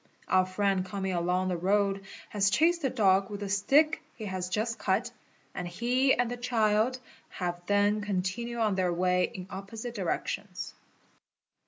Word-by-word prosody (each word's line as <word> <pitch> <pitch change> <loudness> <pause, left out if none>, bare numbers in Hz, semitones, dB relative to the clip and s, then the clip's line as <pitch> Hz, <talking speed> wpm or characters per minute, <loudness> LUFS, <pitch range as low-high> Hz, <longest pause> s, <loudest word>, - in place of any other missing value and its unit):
Our 185 0 +3
friend 195 0 +1
coming 190 0 -3
along 180 +2 0
the 180 - -1
road 195 +2 +1 0.2
has 200 -2 +2
chased 335 - +3
the 270 - +1
dog 195 -5 +3
with 205 -1 -6
the 200 - -3
stick 280 +11 +3
he 220 - -7
has 185 -2 -3
just 220 +4 -1
cut - - 0 0.4
and 180 -1 -4
he 250 +8 +2
and 245 0 0
the 245 - -3
© - - -17
child 225 +1 +2 0.3
have 175 -1 -4
then 205 +1 +3
continued 210 +4 -2
on 215 -2 +2
their 185 -2 +1
way 180 +1 +2
in 185 - -7
opposite 215 +5 -6
directions. 195 -1 -3
200 Hz, 165 wpm, -29 LUFS, 185-230 Hz, 0.4 s, Our